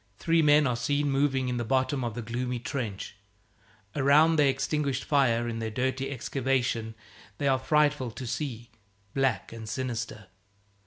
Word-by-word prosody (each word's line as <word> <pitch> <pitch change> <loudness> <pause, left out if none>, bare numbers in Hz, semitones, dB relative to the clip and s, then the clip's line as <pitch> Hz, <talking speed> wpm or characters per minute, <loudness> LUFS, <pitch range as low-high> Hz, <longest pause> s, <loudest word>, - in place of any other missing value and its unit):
Three 165 0 +2
men 150 0 +5
are 125 -2 +1
seen 145 +4 0
moving 135 -1 +1
in 125 -1 -1
the 120 - -1
bottom 130 +2 0
of 115 -3 -3
the 120 - -4
gloomy 125 +2 -3
trench. 115 -6 -5 0.8
Around 150 +4 +5
their 145 -2 +5
extinguished 135 0 -1
fire 120 -5 +2
in 115 -1 -3
the 110 0 -2
dirty 130 +4 -1
excavation 125 -4 -1 0.4
they 140 - -1
are 135 -1 +3
frightful 150 -2 +2
to 125 +3 -8
see, 120 -2 -4 0.4
black 135 -3 0
and 110 -1 -8
sinister. 115 -5 -4
130 Hz, 155 wpm, -28 LUFS, 120-140 Hz, 0.8 s, men